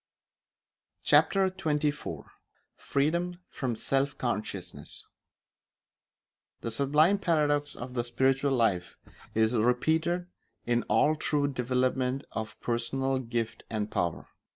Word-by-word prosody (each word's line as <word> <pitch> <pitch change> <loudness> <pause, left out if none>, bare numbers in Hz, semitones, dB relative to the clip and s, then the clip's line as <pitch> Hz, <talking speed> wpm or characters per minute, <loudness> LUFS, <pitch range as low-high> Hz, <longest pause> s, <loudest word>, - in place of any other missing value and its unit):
Chapter 195 -1 +5
XXIV 150 -5 -2 0.5
Freedom 170 +5 0
from 125 -4 -2
Self 135 +5 0
Consciousness 100 - -4 1.6
The 115 - -3
sublime 150 - +3
paradox 145 -5 +1
of 125 +1 -7
the 120 -1 0
spiritual 130 +3 +1
life 95 -8 +1 0.4
is 110 +1 +3
repeated 160 +10 +2 0.4
in 120 0 +2
all 150 +9 +4
true 150 -2 +1
development 130 0 0
of 110 0 -5
personal 130 +3 0
gift 115 -2 -3
and 105 -1 -2
power. 85 -5 -2
130 Hz, 100 wpm, -29 LUFS, 115-150 Hz, 1.6 s, Chapter